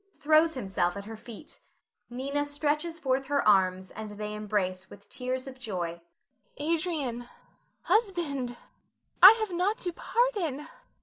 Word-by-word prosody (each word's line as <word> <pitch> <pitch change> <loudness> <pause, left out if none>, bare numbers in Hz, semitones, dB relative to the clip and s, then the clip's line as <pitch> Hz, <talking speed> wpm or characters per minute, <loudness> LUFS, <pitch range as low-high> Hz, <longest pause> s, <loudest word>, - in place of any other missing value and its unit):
[Throws 310 +2 +4
himself 190 -6 -1
at 200 - -7
her 225 +1 -7
feet. 230 +6 -10 0.5
Nina 280 +4 -2
stretches 300 +3 -1
forth 270 -3 -1
her 280 -4 +1
arms, 185 -2 +3
and 220 -1 -7
they 210 0 -5
embrace 200 -3 -2
with 200 0 -14
tears 255 +1 -3
of 260 -1 -10
joy.] 175 -8 -4 0.6
Nina. 305 +3 0
Adrian, 285 -8 -3 0.5
husband, 310 - 0 0.6
I - - +12
have 435 -3 -3
naught 385 +5 +1
to 355 -1 -3
pardon. 365 - -1
260 Hz, 135 wpm, -28 LUFS, 210-315 Hz, 0.6 s, I